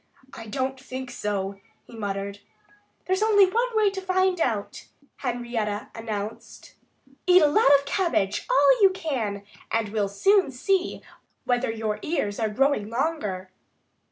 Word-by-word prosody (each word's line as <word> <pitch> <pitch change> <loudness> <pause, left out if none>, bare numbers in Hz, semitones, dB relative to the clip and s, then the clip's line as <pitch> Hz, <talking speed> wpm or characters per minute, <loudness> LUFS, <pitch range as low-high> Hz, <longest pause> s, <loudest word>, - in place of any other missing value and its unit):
"I 225 - -9
don't 265 +3 -2
think 260 -1 -7
so," 200 -1 -3 0.3
he 235 - -13
muttered. 200 -1 -4 0.7
"There's 375 +2 0
only 420 -2 +6
one 460 +6 +1
way 420 -2 +4
to 385 -1 -5
find 375 -1 +1
out," 215 -7 -2 0.3
Henrietta 235 -5 -3
announced. 215 -1 -6 0.5
"Eat 360 -2 +7
a - - +6
lot 295 +1 +4
of 280 - -8
cabbage 280 - 0
all - - +5
you 390 - +8
can! 250 - -3 0.3
And 225 -2 0
we'll 205 -2 -1
soon 385 - +3
see 370 +9 -1 0.4
whether 245 0 +1
your 220 -2 -2
ears 210 -11 -2
are 220 -1 0
growing 235 -2 +1
longer." 230 - -2
245 Hz, 140 wpm, -25 LUFS, -, 0.7 s, you